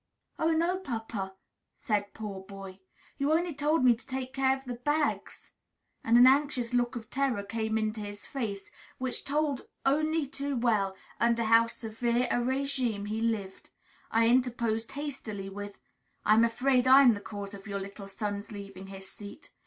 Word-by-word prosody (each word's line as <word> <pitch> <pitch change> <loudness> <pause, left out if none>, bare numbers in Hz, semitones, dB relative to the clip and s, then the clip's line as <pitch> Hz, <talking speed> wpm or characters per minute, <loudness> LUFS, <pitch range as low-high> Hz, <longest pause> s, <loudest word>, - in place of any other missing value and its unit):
"Oh, 320 - +2
no, 340 +3 +2
papa," 225 - -4 0.4
said 210 -7 -2
poor 205 -3 -5
Boy, 195 -1 -10 0.4
"you 280 +2 +2
only 335 +1 +2
told 295 0 +2
me 245 - +8
to 230 - -15
take 260 -1 -5
care 265 0 +2
of 270 - -16
the 250 - -4
bags." 295 +4 -1 0.5
And 230 +1 +5
an 245 - +9
anxious 260 -3 +3
look 245 0 +1
of 230 -1 -7
terror 265 -6 0
came 220 +1 -1
into 215 0 -1
his 205 0 -7
face, 205 -7 -4 0.3
which 255 -1 -3
told 285 -2 -1 0.2
only 310 +3 +2
too 280 0 -3
well 215 -5 +1 0.2
under 235 0 +3
how 230 +1 +5
severe 235 +2 -1
a - - +2
régime 250 -4 -1
he 220 +1 -2
lived. 215 -4 -2 0.4
I 225 0 +3
interposed 235 -2 +1
hastily 255 -9 -5
with 205 +1 -7 0.5
"I 210 - +6
am 225 +1 +6
afraid 250 +2 +2
I 270 +2 +9
am 245 -3 +7
the 205 - -5
cause 205 -1 -7
of 200 +1 -10
your 200 -1 -3
little 200 +1 -8
son's 205 +1 -4
leaving 195 -2 -8
his 195 0 -8
seat. 205 +9 -10
230 Hz, 170 wpm, -30 LUFS, 205-270 Hz, 0.5 s, an